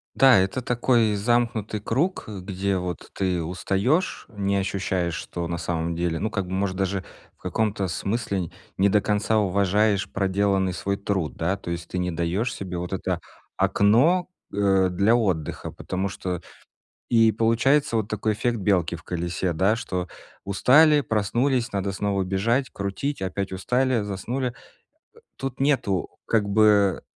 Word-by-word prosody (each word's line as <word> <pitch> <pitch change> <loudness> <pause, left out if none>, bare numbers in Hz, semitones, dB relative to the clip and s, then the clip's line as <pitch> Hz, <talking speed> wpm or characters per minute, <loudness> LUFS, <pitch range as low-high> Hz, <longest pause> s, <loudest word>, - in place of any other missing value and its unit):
Да, 130 -6 +7
это 95 +7 0
такой 120 -3 +2
замкнутый 110 -1 0
круг, 145 - -1
где 100 -1 -3
вот 90 -2 -5
ты 90 -3 0
устаешь, 95 - 0
не 100 -2 -1
ощущаешь, 95 -3 -1
что 85 +2 -5
на 85 - -3
самом 85 -1 -2
деле, 85 -1 -1
ну, 110 - -1
как 100 -3 -2
бы - - -8
может 95 0 -1
даже 95 0 -1 0.3
в - - -35
каком-то 100 +1 -1
смысле 100 -1 -2 0.3
не 100 +2 +4
до 105 +1 +4
конца 105 +2 +1
уважаешь 100 +1 +2
проделанный 95 -1 +1
свой 100 +3 -2
труд, 95 -5 -2
да, 90 +4 0
то 90 -3 -7
есть 85 -1 -5
ты 95 - -5
не 90 -1 -1
даешь 90 +9 -1
себе 90 -2 -5
вот 90 +1 -5
это 95 -2 -2 0.4
окно, 130 - +3 0.3
э, 95 -2 +3
для 100 +6 +3
отдыха, 95 -10 -1
потому 95 +1 -3
что 90 -2 -4 0.7
и 115 -2 +5
получается 115 +4 +2
вот 110 -2 -1
такой 110 0 -1
эффект 120 +2 -1
белки 95 -4 +1
в 80 - -15
колесе, 85 +1 -2
да, 95 +7 +2
что 90 -5 -3 0.4
устали, 145 +10 +5
проснулись, 120 +3 0
надо 100 0 -1
снова 100 0 -1
бежать, 115 +8 0
крутить, 100 +9 -3
опять 95 +1 -3
устали, 125 +5 +1
заснули. 120 +6 -3 0.8
Тут 135 -2 -5
нету 135 - +1 0.2
как 105 -3 +1
бы 100 -3 +4
100 Hz, 150 wpm, -24 LUFS, 95-115 Hz, 0.8 s, Да